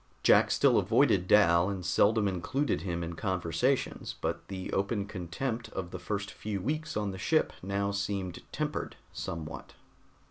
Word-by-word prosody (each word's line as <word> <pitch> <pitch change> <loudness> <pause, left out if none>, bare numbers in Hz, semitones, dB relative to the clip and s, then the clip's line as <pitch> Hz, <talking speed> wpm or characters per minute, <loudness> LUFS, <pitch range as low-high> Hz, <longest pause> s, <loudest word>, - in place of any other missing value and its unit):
Jack - - +6
still - - +4
avoided 90 - +3
Dal 90 -3 +5
and 95 -3 -4
seldom 100 +4 +3
included 95 - -1
him 85 -2 -2
in 85 +1 -4
conversations, 95 - -1
but - - -3
the 95 -1 -5
open 100 +1 0
contempt 110 +5 -4
of 90 -2 -4
the 95 - -5
first 100 0 -3
few 105 -2 -4
weeks 155 +8 -2
on 105 -2 -1
the 95 - -7
ship 155 +10 +2
now 100 +1 -1
seemed 100 -3 -3
tempered - - -3 0.2
somewhat. 80 -1 -6
100 Hz, 150 wpm, -30 LUFS, 90-105 Hz, 0.2 s, Jack